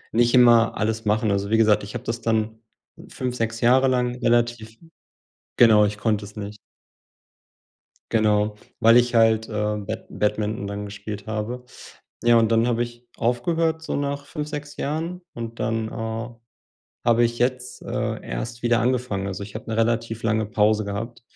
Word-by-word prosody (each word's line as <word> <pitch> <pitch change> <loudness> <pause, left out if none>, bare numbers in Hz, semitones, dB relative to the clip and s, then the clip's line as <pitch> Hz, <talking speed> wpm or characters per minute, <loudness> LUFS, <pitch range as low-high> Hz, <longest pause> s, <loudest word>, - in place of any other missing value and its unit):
nicht 120 +1 +4
immer 120 -2 +5
alles 110 +1 -1
machen. 105 0 +1
Also, 100 0 -1
wie 110 - +3
gesagt, 110 -2 +4
ich 100 - -8
habe - - -4
das 115 +1 -4
dann 110 0 -1 0.5
5, 125 -1 -4
6 115 -1 -2
Jahre 130 +3 +5
lang 125 -1 +1
relativ 120 -1 0 0.8
genau, 110 -3 +6
ich 105 0 -2
konnte 105 -1 0
es 105 +2 -13
nicht. 105 0 -6 1.6
Genau, 105 -1 +2 0.2
weil 115 0 +6
ich 120 0 +2
halt, 110 -1 +4
äh, - - -9 0.3
Bad 100 - -5
Badminton 105 0 -1
dann 100 0 -5
gespielt 105 0 -7
habe. 110 +4 -4 0.6
Ja, 120 0 +6
und 115 -1 +3
dann 115 +1 +3
habe 120 0 +1
ich 120 0 -10
aufgehört 160 +7 0
so 160 - -4
nach 140 0 -2
5, 150 -2 -5
6 150 -1 -7
Jahren 165 +5 -3
und 115 0 -7
dann, 110 0 -1
äh, 115 +1 -4 0.8
habe 120 0 +4
ich 120 0 -1
jetzt, 125 0 -2
äh, - - -3
erst 115 - -5
wieder 120 -1 +2
angefangen. 120 -5 -1
Also, 95 0 -5
ich 100 0 -9
habe 110 - -7
'ne 110 - -2
relativ 115 0 0
lange 110 -1 +1
Pause 110 0 +2
gehabt 115 +4 -5
115 Hz, 170 wpm, -23 LUFS, 110-120 Hz, 1.6 s, genau